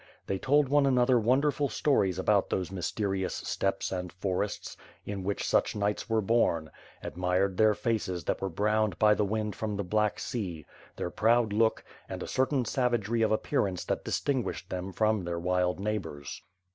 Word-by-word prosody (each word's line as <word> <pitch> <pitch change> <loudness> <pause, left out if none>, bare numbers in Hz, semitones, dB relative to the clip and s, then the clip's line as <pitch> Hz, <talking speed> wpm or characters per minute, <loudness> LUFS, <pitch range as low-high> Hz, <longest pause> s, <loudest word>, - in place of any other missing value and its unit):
They 95 - -2
told 145 +4 +3
one 140 +1 +3
another 125 -1 +4
wonderful 140 +5 +2
stories 100 - +1
about 100 +1 +2
those 95 0 -2
mysterious 95 +1 -2
steppes 95 0 -2
and 90 -2 -3
forests, 95 +2 -3 0.3
in 100 -2 -4
which 100 +2 -2
such - - +2
knights 105 +1 -1
were 110 -1 +2
bom; 90 -8 +1 0.3
admired 90 +2 0
their 110 -1 +5
faces 100 -8 -2
that - - -2
were 95 - -1
browned 105 +1 +1
by 105 +1 +5
the 105 - +1
wind 105 +1 -2
from 105 -2 -3
the 100 - -1
Black 105 +3 +1
Sea; 90 - -4 0.3
their 90 - -4
proud 115 -1 +2
look, 110 +1 +2 0.3
and - - -5
a - - -6
certain 130 -1 +1
savagery 120 -2 0
of 110 - +3
appearance 100 -3 0
that - - -2
distinguished 130 -9 -2
them 95 +1 -4
from 110 0 +1
their 85 0 -3
wild 90 +1 0
neighbors. 95 -9 -4
105 Hz, 170 wpm, -29 LUFS, 95-115 Hz, 0.3 s, their